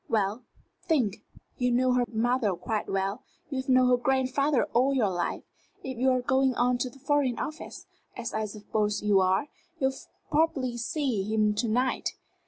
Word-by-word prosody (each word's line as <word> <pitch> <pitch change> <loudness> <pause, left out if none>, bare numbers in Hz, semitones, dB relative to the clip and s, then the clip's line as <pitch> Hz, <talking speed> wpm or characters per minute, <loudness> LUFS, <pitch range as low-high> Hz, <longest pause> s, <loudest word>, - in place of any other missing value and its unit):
"Well, 210 +1 0 0.4
think. 245 - +1 0.4
You 250 0 +2
knew 255 +1 +3
her 250 -1 +2
mother 230 -3 +1
quite 210 +5 -3
well. 195 +4 -1 0.3
You 270 - -2
have 260 0 -4
known 255 -1 +5
her 250 - +5
grandfather 265 +2 +1
all 265 +3 +3
your 215 -7 +2
life. 175 -1 -2 0.4
If 260 -3 -5
you're 255 0 +3
going 265 0 +2
on 245 0 +2
to 255 - -1
the 250 - -17
Foreign 275 -2 +1
Office, 310 +1 -6 0.3
as 240 -1 -5
I 220 0 -1
suppose 210 0 -2
you 205 -2 +4
are, 190 +5 +2 0.3
you'll 265 0 +1 0.4
probably 285 -6 +1
see 240 -1 -1
him 215 +1 +1
to 215 +3 -1
night. 250 +4 0
245 Hz, 170 wpm, -28 LUFS, 215-265 Hz, 0.4 s, known